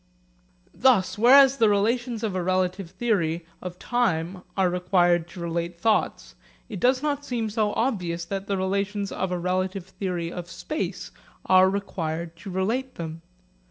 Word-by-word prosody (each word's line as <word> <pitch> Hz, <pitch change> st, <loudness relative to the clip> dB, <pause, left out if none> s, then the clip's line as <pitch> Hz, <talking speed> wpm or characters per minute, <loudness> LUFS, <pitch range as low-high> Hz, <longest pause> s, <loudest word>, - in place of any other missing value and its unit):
Thus 240 Hz, -8 st, +3 dB
whereas 270 Hz, +3 st, +7 dB
the 225 Hz, -4 st, +4 dB
relations 230 Hz, +3 st, 0 dB
of 215 Hz, -4 st, -1 dB
a 185 Hz, -, -1 dB
relative 185 Hz, 0 st, 0 dB
theory 175 Hz, -5 st, -1 dB, 0.2 s
of 180 Hz, -1 st, -7 dB
time 180 Hz, -7 st, -1 dB, 0.2 s
are 190 Hz, -1 st, +3 dB
required 175 Hz, -1 st, +2 dB
to 175 Hz, -, -11 dB
relate 170 Hz, 0 st, -3 dB
thoughts, 220 Hz, +3 st, 0 dB, 0.4 s
it 205 Hz, -5 st, -5 dB
does 255 Hz, +5 st, +2 dB
not 290 Hz, -1 st, -1 dB
seem 230 Hz, -5 st, -2 dB
so 215 Hz, -1 st, +1 dB
obvious 180 Hz, -9 st, -1 dB
that 195 Hz, +2 st, -4 dB
the 200 Hz, -, 0 dB
relations 200 Hz, +1 st, -1 dB
of 190 Hz, -1 st, -2 dB
a 180 Hz, -, 0 dB
relative 185 Hz, +1 st, -1 dB
theory 180 Hz, -3 st, -4 dB
of 175 Hz, -1 st, -7 dB
space 310 Hz, -, -4 dB, 0.3 s
are 185 Hz, 0 st, +6 dB
required 170 Hz, -4 st, -3 dB
to 195 Hz, -, -9 dB
relate 225 Hz, +8 st, -1 dB
them. 165 Hz, -1 st, -6 dB
190 Hz, 155 wpm, -25 LUFS, 175-220 Hz, 0.4 s, whereas